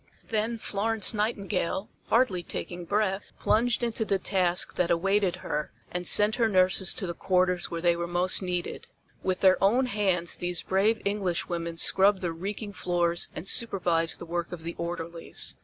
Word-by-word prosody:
Then 225 +1 -1
Florence 220 0 0
Nightingale, 205 -3 -1 0.2
hardly 230 -7 +2
taking 175 0 -6
breath, 200 +1 0 0.2
plunged 240 +2 +1
into 230 -1 -1
the 200 -2 0
task 180 -2 0
that 180 - 0
awaited 195 +2 +1
her 150 0 -3 0.2
and 180 0 -2
sent 210 +2 +5
her 230 -2 +2
nurses 185 -1 +3
to - - -2
the 170 - -3
quarters 180 0 0
where 165 -1 -4
they 170 0 +3
were 170 0 -3
most 175 +3 +1
needed. 180 -2 -4 0.3
With 185 -1 -2
their 190 0 +4
own 240 +7 +4
hands 195 -7 +1
these 175 0 -2
brave 205 +4 +1
Englishwomen 175 -4 -2
scrubbed 195 +3 +4
the 175 -2 -1
reeking 205 +4 -5
floors 175 -2 0
and 185 - -6
supervised 175 -8 +2
the - - -7
work 170 0 -3
of 175 -2 -7
the 170 +1 -5
orderlies. 170 0 -3
185 Hz, 165 wpm, -27 LUFS, 175-205 Hz, 0.3 s, sent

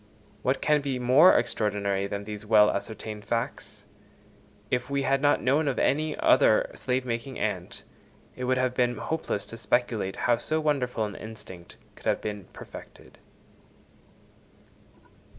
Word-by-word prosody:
What 130 +1 0
can 150 -1 +3
be 140 -2 -2
more 130 +8 +6
extraordinary 100 -2 -1
than 100 0 -4
these 105 0 -7
well 105 -1 +5
ascertained 105 +1 -5
facts? 115 +1 -4 0.9
If 125 +1 -1
we 140 0 0
had 135 0 +1
not 145 0 +3
known 145 +4 +2
of 135 - 0
any 155 +3 +1
other - - +4
slave 130 0 -2
making 120 +2 -4
ant, - - -3 0.5
it 125 - -4
would 130 +1 +1
have 130 -1 +1
been 120 -2 +1
hopeless 155 -10 -3
to 115 - -9
speculate 115 -3 0
how 120 -1 +4
so 155 +6 -1
wonderful 130 -7 0
an 105 - -6
instinct 95 -6 -11 0.2
could - - -9
have - - +2
been 105 -3 -5
perfected. - - -13
125 Hz, 145 wpm, -27 LUFS, 105-135 Hz, 0.9 s, more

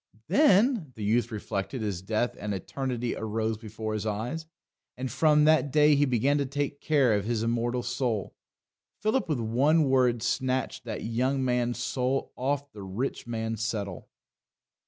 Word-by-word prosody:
"Then," 205 - +4
the 110 - -6
youth 115 +3 +1
reflected 110 +3 -3
as 100 -5 -2
death 110 +5 -1
and 105 -1 -3
eternity 125 +4 -3
arose 110 0 -2
before 110 0 -5
his 110 0 -2
eyes, 120 +10 -3 0.5
and 130 0 -4
from 150 -2 +4
that 155 -1 +4
day 150 +1 +5
he 145 +1 +4
began 135 +3 +2
to 140 - +1
take 145 +1 -3
care 140 -7 +3
of 100 -1 0
his 115 -1 -1
immortal 120 +1 0
soul. 120 -4 -2 0.7
Philip 215 -2 +1
with 150 -5 0
one 135 +8 +3
word 125 -4 +2
snatched 130 +1 -1
that - - -5
young 130 +4 0
man's 120 -1 0
soul 130 +2 -1
off 140 +2 -2
The 105 - -10
Rich 100 +8 -4
Man's 115 -1 -3
Settle. 100 -7 -4
125 Hz, 155 wpm, -28 LUFS, 110-140 Hz, 0.7 s, day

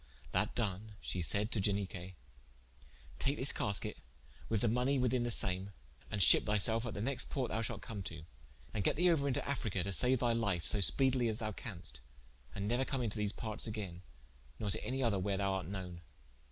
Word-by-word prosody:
That - - 0
done 105 -1 -2
she 90 - -3
sayd 105 +6 +2
to 105 - +2
Ianique: 95 -2 -2 1.0
"Take 140 +2 +1
this 135 - +5
casket 105 +1 -2 0.5
with 110 -3 +1
all - - +4
the 110 - +2
money 125 +3 +2
within 125 -1 +2
the 120 - 0
same, 95 -3 0 0.4
and 105 - -1
shippe - - +8
thy 105 0 +2
selfe 115 +4 +3
at 115 - -5
the 100 - -2
next 135 +1 -1
port 130 -3 -2
thou 110 - 0
shalt 110 - -3
come 105 -3 -5
to, 80 -2 -6 0.5
and 105 - -1
get - - +2
thee 175 +2 +5
ouer 140 -4 +2
into 135 - -1
Africa 110 -10 -1
to 100 - -2
saue 125 +6 +3
thy 120 -1 +2
life 100 -7 0
so 105 - +2
spedely 125 +3 +4
as 110 - -2
thou 110 -2 -3
canst, 85 - -6 0.6
and 100 0 -2
neuer 120 +4 +2
come 135 -2 -2
into 110 -1 -2
these 105 -1 0
partes 110 0 -4
again, 100 -5 -5 0.6
nor 105 -2 -2
to - - -2
any 130 +1 -1
other 110 -5 +2
wher 100 +1 0
thou 100 0 +1
art 95 -3 -3
knowen." 90 -3 -6
105 Hz, 210 wpm, -35 LUFS, 95-120 Hz, 1.0 s, shippe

